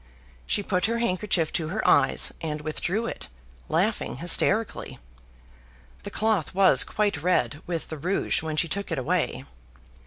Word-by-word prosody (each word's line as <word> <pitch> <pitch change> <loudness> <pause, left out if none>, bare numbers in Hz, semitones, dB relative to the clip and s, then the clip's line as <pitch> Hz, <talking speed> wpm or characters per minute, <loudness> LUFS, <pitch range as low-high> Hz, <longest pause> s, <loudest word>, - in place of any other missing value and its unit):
She 205 - +1
put 185 0 +1
her 230 +1 0
handkerchief 185 -6 0
to 160 - -1
her 210 +7 -2
eyes, - - +3
and 155 -2 -3
withdrew 180 +8 -2
it, - - -5 0.4
laughing - - 0
hysterically 195 - +1 1.0
the - - -7
cloth 210 -6 0
was 190 -9 +6
quite 205 -8 -1
red 170 -3 +1
with 170 -2 -3
the 160 - -6
rouge 180 +4 0
when 160 -1 -4
she 170 - +2
took 200 +5 -3
it - - -1
away. 120 - -1
180 Hz, 150 wpm, -26 LUFS, 155-205 Hz, 1.0 s, was